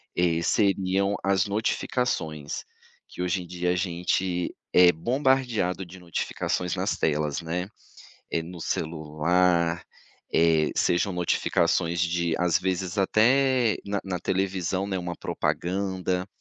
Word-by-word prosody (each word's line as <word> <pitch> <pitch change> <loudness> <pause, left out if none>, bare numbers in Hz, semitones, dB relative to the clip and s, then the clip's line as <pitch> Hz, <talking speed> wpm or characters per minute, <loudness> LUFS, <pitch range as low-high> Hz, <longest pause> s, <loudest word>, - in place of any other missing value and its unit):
eh, 85 -2 +2
seriam 100 0 +2
as 95 -1 +2
notificações, 100 - -2 0.4
que - - -8
hoje 90 +1 0
em 90 - -10
dia 90 0 -1
a - - +1
gente 90 0 -1 0.2
é 90 -1 +7
bombardeado 120 - 0
de 90 +2 -12
notificações 90 0 -2
nas - - -1
telas, 75 -1 0
né. 85 +2 -3 0.7
Eh, 80 - +1
no 85 +1 -9
celular, 85 +2 0 0.5
eh, 80 -1 +3
sejam 90 +3 +1
notificações 85 -1 +1
de 85 -1 0
às 90 -2 +2
vezes 95 +1 -2
até 125 +4 +3
na 100 0 -2
na 95 -2 -3
televisão, 95 0 -1
né, 95 -1 -1
uma 90 -1 -4
propaganda. 95 0 -2
90 Hz, 120 wpm, -26 LUFS, 85-95 Hz, 0.7 s, é